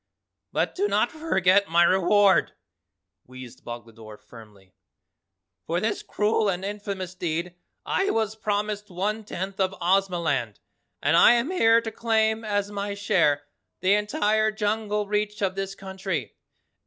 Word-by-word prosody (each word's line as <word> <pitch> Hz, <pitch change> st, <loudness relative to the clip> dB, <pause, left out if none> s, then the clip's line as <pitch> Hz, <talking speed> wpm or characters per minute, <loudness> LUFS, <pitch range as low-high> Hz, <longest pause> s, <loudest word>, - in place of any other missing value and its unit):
"But -, -, -1 dB
do 400 Hz, +2 st, 0 dB
not -, -, +1 dB
forget 200 Hz, -, +2 dB
my 170 Hz, +1 st, +5 dB
reward," 190 Hz, +2 st, +4 dB, 0.7 s
wheezed 130 Hz, -1 st, -12 dB
Boglodore 115 Hz, -2 st, -10 dB
firmly. 105 Hz, -6 st, -16 dB, 0.9 s
"For 170 Hz, +1 st, 0 dB
this 215 Hz, +1 st, -1 dB
cruel 210 Hz, 0 st, 0 dB
and 185 Hz, 0 st, -2 dB
infamous 200 Hz, -3 st, -5 dB
deed 170 Hz, -1 st, -3 dB, 0.3 s
I 390 Hz, -, 0 dB
was 220 Hz, -1 st, 0 dB
promised 210 Hz, -1 st, -2 dB
one 205 Hz, +5 st, -2 dB
tenth 195 Hz, -1 st, -6 dB
of 190 Hz, 0 st, 0 dB
Ozamaland 170 Hz, -, 0 dB, 0.5 s
and 145 Hz, +3 st, +3 dB
I 170 Hz, -, +7 dB
am 240 Hz, +7 st, 0 dB
here 230 Hz, -10 st, +4 dB
to 225 Hz, -1 st, -5 dB
claim 220 Hz, 0 st, +1 dB
as 205 Hz, -1 st, -1 dB
my 200 Hz, 0 st, -4 dB
share 165 Hz, -8 st, +2 dB, 0.4 s
the 190 Hz, +2 st, +3 dB
entire 210 Hz, +1 st, +1 dB
jungle 210 Hz, 0 st, -1 dB
reach 210 Hz, 0 st, -2 dB
of 190 Hz, -1 st, +1 dB
this 195 Hz, 0 st, -4 dB
country. 190 Hz, -, -5 dB
200 Hz, 135 wpm, -25 LUFS, 175-210 Hz, 0.9 s, I